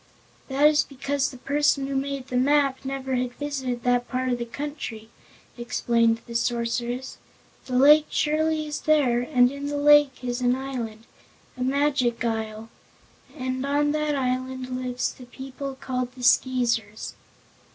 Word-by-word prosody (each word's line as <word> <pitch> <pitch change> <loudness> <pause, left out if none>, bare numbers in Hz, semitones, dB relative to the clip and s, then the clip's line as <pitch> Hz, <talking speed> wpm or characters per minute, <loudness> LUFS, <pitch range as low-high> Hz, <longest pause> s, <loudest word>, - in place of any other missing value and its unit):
"That 275 +2 +2
is 300 -1 +4
because 275 0 -2
the 255 - -11
person 280 +1 +1
who 275 0 -3
made 270 -1 -3
the 255 - -4
map 275 +1 +2
never 265 -1 -4
had 245 0 -2
visited 265 -5 -3
that 245 0 +2
part 255 0 -1
of 245 -1 0
the 235 - -3
country," 245 -5 -6 0.5
explained 230 -1 +1
the 235 - -9
Sorceress. 235 +2 -2 0.5
"The 250 -1 0
lake 295 +3 +7
surely 310 +1 +1
is 295 -1 -4
there, 275 -6 +3
and 245 -1 +3
in 280 0 -5
the 290 0 -2
lake 290 -2 +5
is 245 0 -2
an 245 0 +3
island 245 -5 -5 0.5
a 255 - -9
Magic 265 -3 +1
Isle 220 0 -3 0.7
and 255 0 -3
on 290 +1 +1
that 300 -1 0
island 255 -1 -2
live 255 -1 -4 0.2
the 250 - -11
people 270 +2 -7
called 255 -1 -3
the 255 -1 -10
Skeezers." 235 -4 +1
260 Hz, 150 wpm, -25 LUFS, 245-280 Hz, 0.7 s, lake